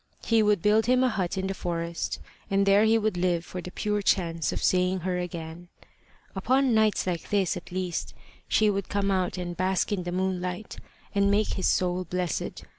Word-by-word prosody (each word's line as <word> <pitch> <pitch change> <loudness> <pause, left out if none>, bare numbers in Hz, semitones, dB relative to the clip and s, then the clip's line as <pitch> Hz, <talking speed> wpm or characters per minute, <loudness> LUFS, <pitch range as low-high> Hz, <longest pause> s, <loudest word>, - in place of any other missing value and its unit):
He 225 -1 +4
would 210 -4 +2
build 215 +1 +3
him 255 +1 +4
a 255 - +3
hut 195 -4 -2
in 190 - -1
the 195 - -1
forest, 170 -2 -3 0.3
and 195 0 +2
there 200 +2 +5
he 225 +1 +4
would 215 -4 0
live 175 -1 0
for 180 - -6
the 180 - -7
pure 210 +2 -1
chance 165 -5 +1
of - - -4
seeing 185 0 +2
her 180 +1 -1
again. 170 -1 -6 0.7
Upon 255 +6 +2
nights 220 -1 +2
like 175 -3 -3
this 195 -4 +1
at 180 - -9
least 180 -2 -3 0.3
she 215 - +3
would 200 -2 -1
come 200 -1 0
out 185 -1 0
and 175 -1 -4
bask 185 +3 0
in 200 -3 0
the 175 0 -4
moonlight, 185 +2 -3 0.4
and 200 0 +3
make 205 +2 +2
his 190 - -1
soul 180 0 +1
blessed. 180 -1 -3
185 Hz, 195 wpm, -27 LUFS, 180-205 Hz, 0.7 s, there